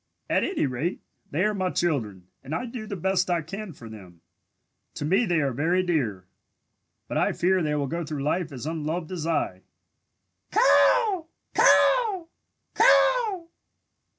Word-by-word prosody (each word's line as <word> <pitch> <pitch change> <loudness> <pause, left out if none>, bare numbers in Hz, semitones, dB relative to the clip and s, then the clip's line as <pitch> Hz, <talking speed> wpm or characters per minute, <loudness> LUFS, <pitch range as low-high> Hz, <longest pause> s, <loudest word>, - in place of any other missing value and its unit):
"At - - +2
any 380 - 0
rate, 140 +7 -2 0.3
they 160 +6 0
are 210 0 +1
my 185 -2 -1
children 115 - -2 0.2
and 140 +4 -4
I 250 - -3
do 230 -2 -7
the 200 - -4
best 185 +1 0
I 170 -2 0
can 195 +5 -7
for 120 -6 -12
them. 95 -6 -13 0.7
To 145 - -4
me 190 +9 +2
they 170 -3 +2
are 135 -3 -1
very 170 +8 +1
dear, 120 - -1 0.8
but - - -1
I - - +1
fear 185 +1 +1
they 150 -2 0
will 145 -1 -1
go 170 +5 -3
through 150 -3 -5
life 160 +2 -1
as 130 -1 -7
unloved 160 +1 -3
as 165 -3 -4
I! 145 - -1 0.9
Caw! 320 - +4 0.3
Caw! 430 -8 +4 0.5
Caw!" 450 -8 +3
165 Hz, 155 wpm, -25 LUFS, 140-190 Hz, 0.9 s, Caw